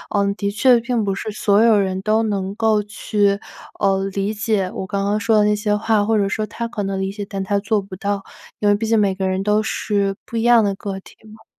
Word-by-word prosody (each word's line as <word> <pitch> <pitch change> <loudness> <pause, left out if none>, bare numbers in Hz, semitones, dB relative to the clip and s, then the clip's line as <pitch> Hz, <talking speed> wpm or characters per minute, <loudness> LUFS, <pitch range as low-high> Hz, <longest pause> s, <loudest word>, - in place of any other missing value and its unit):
嗯， 200 0 +1
的 200 -1 -2
确 240 +4 +4
并 235 -1 -1
不 195 -1 -1
是 215 +2 -5
所 205 0 +2
有 225 -3 +5
人 190 -1 -1
都 215 +1 +2
能 195 -3 -2
够 215 -1 +1
去， 205 -1 0 0.4
呃， 195 -1 +2
理 200 +2 -1
解 205 -3 0
我 190 - -4
刚 200 0 -2
刚 205 +1 +1
说 225 -1 +3
的 210 - +4
那 210 0 +3
些 210 0 0
话， 210 0 +1
或 225 +1 +1
者 200 -2 +1
说 215 +2 -1
他 230 +3 -5
可 215 -3 -4
能 195 0 -2
理 190 0 -2
解， 205 0 -6
但 195 -1 -4
他 200 +1 0
做 205 +1 0
不 190 -1 -10
到， 200 +1 -2 0.4
因 205 - +2
为 205 - +5
毕 220 +2 -3
竟 225 0 +2
每 195 -2 +2
个 190 0 -1
人 190 0 -1
都 210 +2 +2
是 200 -2 -1
不 230 - -5
一 225 - 0
样 240 -2 +5
的 200 -1 0
个 195 -1 -5
体 - - -17 0.2
嘛。 220 0 -17
205 Hz, 275 characters per minute, -20 LUFS, 195-215 Hz, 0.4 s, 有